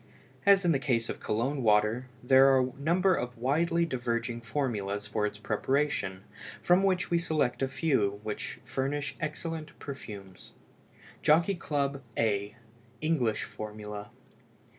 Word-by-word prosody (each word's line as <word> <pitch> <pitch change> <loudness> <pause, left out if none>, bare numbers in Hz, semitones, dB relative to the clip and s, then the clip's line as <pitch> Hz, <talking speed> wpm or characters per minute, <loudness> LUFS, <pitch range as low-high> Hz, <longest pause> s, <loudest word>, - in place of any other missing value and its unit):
As 195 -2 +6
in 170 - +4
the 140 - +2
case 115 -5 0
of - - -4
Cologne 130 +6 -1
water, 110 +3 +3 0.2
there 130 +2 +7
are 135 -1 +5
a 130 0 -1
number 180 +5 +3
of 125 -6 -3
widely 165 +7 +2
diverging 120 -4 -2
formulas 105 -6 -2
for 105 0 0
its 105 - -7
preparation, 105 -3 -1 0.4
from 180 +2 +5
which 185 -2 +1
we 170 - +4
select 155 -7 0
a 135 - +2
few 130 -8 +1
which 105 -1 -5
furnish 140 +2 -2
excellent 155 0 -5
perfumes. 100 -9 -9 0.7
JOCKEY 165 +6 +4
CLUB, 140 -5 -2 0.2
A 105 -2 0 0.5
(ENGLISH 135 -9 +1
FORMULA). 105 -1 -7
130 Hz, 135 wpm, -29 LUFS, 110-155 Hz, 0.7 s, there